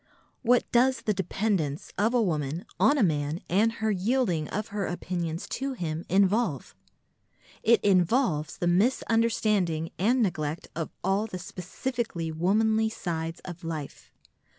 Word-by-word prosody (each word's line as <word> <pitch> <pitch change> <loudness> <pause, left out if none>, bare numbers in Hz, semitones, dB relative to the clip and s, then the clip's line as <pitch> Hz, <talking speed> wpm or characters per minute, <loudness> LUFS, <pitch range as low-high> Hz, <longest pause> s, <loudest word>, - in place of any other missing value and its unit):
What 245 0 +4
does 255 +2 +3
the 215 - +1
dependence 190 -5 -1
of 220 +5 +1
a 245 - +4
woman 155 -2 -2
on 290 - +5
a 255 - +3
man 150 -2 0
and 215 +5 +2
her 220 -1 -1
yielding 190 - +1
of 210 +1 -4
her 200 -2 -2
opinions 175 -2 -3
to 270 +1 -2
him 165 -7 -4
involve? 195 - +2 0.9
It 230 0 +5
involves 180 - +2
the - - -2
misunderstanding 205 -4 +2
and 235 +6 +3
neglect 155 -4 -2
of 165 -1 -3
all 195 +4 +1
the 185 - -6
specifically 185 0 -4
womanly 220 +7 +2
sides 165 -5 -4
of 175 -1 -9
life. 155 -4 -6
190 Hz, 135 wpm, -27 LUFS, 165-225 Hz, 0.9 s, on